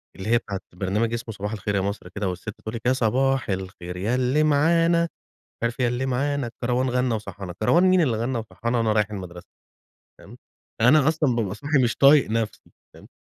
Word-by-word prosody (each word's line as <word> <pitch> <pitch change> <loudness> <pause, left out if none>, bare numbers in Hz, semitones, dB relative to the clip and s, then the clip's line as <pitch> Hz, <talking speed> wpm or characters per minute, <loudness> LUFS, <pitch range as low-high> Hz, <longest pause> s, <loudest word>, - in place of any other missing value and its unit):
اللّي 95 +3 -6
هي 120 - +5
بتاعة 100 -4 -5
برنامج 105 +5 -1
إسمه 115 -1 -4
صباح 105 0 -5
الخير 105 -1 -3
يا 95 - +1
مصر 100 -2 -4
كده 100 0 -3
والسّت 90 +3 -6
بتقول 110 +2 -7
لِك: 115 - -5
"يا 125 - +4
صباح 130 +2 +1
الخير 95 -2 -5
يا 105 +7 0
إللّي 130 +4 +2
معانا، 165 +3 +3
مش 170 - -2 0.5
عارف 120 +2 -2
إيه 125 - +3
يا - - +1
إللّي 125 +2 -2
معانا 135 +1 -1
الكَروان 125 +2 -1
غنّى 125 -1 +1
وصحّانا" 100 -4 -6
كَروان 170 +11 +4
مين 185 -1 +5
إللّي 125 -9 +1
غنّى 120 +2 -2
وصحّانا 115 +2 -3
وأنا 115 -2 +2
رايح 105 -1 +1
المدرسة! 90 -4 -8 0.7
فاهِم، - - -14 0.4
أنا 135 +5 +5
أصلًا 155 -6 +1
بابقى 100 -4 -1
صاحي 140 +5 +1
مش 120 -2 0
طايق 140 -3 +5
نفسي 115 -1 -3 0.2
فاهِم، - - -15
115 Hz, 205 wpm, -24 LUFS, 105-135 Hz, 0.7 s, هي